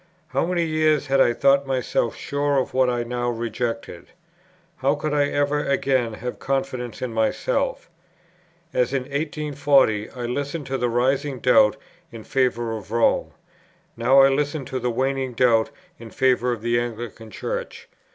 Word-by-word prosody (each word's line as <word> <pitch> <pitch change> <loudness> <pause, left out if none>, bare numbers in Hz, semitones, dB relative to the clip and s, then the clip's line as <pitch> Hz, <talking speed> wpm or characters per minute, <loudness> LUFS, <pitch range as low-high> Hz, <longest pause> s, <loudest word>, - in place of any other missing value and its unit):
How - - 0
many 175 -1 0
years 155 -2 +2
had 135 -1 +3
I 120 - +5
thought 140 +3 +3
myself 125 -3 -1
sure 140 0 -1
of 130 - -1
what 130 -1 +3
I 120 -1 -1
now 120 0 -2
rejected? 115 -4 -4 0.7
how 140 +2 +1
could 150 0 -3
I 145 -1 +3
ever 145 +1 0
again 130 -4 0
have 125 +3 -6
confidence 130 -4 -3
in 125 -3 -3
myself? - - -1 0.9
As 125 +1 +1
in 135 -2 0
1840 140 -6 +1
I 125 -2 -6
listened 140 +5 -3
to 135 0 -3
the 125 - +1
rising 130 +3 0
doubt 105 -4 +4 0.3
in 115 -1 -9
favour 120 -3 0
of 105 -3 -9
Rome, 115 0 +1 0.6
now 125 +4 +5
I 135 - +6
listened 145 +1 -1
to 130 - -2
the 125 0 -1
waning 130 +1 -1
doubt 115 -2 +3 0.3
in 115 - -10
favour 125 0 +2
of 115 -2 -4
the 120 0 +2
Anglican 115 -1 -6
Church. - - -5
130 Hz, 160 wpm, -23 LUFS, 120-140 Hz, 0.9 s, I